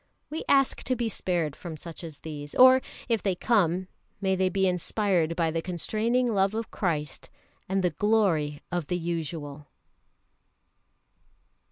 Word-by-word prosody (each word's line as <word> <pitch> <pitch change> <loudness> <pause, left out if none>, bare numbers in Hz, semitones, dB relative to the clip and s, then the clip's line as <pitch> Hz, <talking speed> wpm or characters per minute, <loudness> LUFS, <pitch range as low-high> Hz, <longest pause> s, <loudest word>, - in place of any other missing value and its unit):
We 315 - -3
ask 275 -1 +3
to 255 - +1
be 235 -1 -1
spared 170 -8 -1
from 165 -3 -7
such 165 +2 -8
as 160 -3 -8
these. 145 -2 -7
Or 260 +1 +8 0.3
if 230 -3 +1
they 195 -3 0
come, 185 -4 +1 0.3
may 190 -1 +1
they 185 0 +2
be 190 0 +1
inspired 180 -2 +1
by 165 -2 +1
the 165 +1 -1
constraining 220 +8 0
love 195 +1 +2
of 225 0 -4
Christ 150 -7 -2 0.4
and 190 0 +1
"The 180 - +2
Glory 165 -6 +1
of 175 -4 -2
the 180 - -1
Usual." 160 -4 -4
180 Hz, 150 wpm, -27 LUFS, 160-215 Hz, 0.4 s, Or